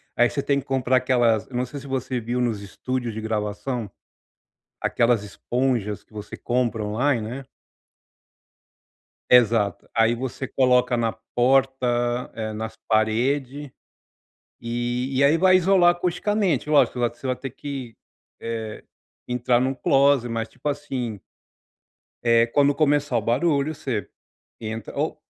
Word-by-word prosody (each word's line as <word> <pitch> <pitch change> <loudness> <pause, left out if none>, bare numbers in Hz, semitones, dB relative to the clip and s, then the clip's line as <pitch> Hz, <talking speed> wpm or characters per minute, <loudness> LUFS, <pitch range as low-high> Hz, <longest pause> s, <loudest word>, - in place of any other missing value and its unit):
Aí 120 0 +4
você 140 - -2
tem 140 -1 +1
que - - -9
comprar 130 -1 +1
aquelas 120 -4 +2
não 125 0 -2
sei 140 +3 -8
se 140 - -11
você 130 -1 -2
viu 120 +2 -3
nos 115 -5 0
estúdios 120 +3 -4
de 110 - -5
gravação, 110 +2 -3 0.9
aquelas 115 -3 +2
esponjas 115 0 -2
que - - -31
você 105 -1 -8
compra 120 -3 -1
online, 120 +4 +1
né. 135 +3 -6 1.9
Exato, 115 -5 +3
aí 115 +1 +3
você 130 +1 -4
coloca 125 -1 +3
na 115 -1 0 0.2
porta, 135 +1 +3 0.7
nas 110 +1 -6
parede, 130 +6 0 0.9
e 120 +2 -2
e 140 - +3
aí 150 +4 +5
vai 185 +1 +5
isolar 185 -1 +5
acusticamente, 175 - 0
lógico 145 -4 +4
você 120 +2 -2
vai 130 - 0
ter 130 +2 -6
que, 135 -3 -7 0.5
eh, 110 -2 -5 0.4
entrar 125 0 +1
num 130 +1 0
closet 135 -2 +3
mas 115 -1 -2
tipo 150 - -5
assim 130 -7 -4 1.0
eh, 115 0 +4
quando 145 +3 +3
começar 145 -4 +2
o 115 - +1
barulho 140 +6 +1
você, 125 -9 -3 0.5
entra 110 -1 -6
ou - - -2
125 Hz, 135 wpm, -24 LUFS, 115-140 Hz, 1.9 s, aí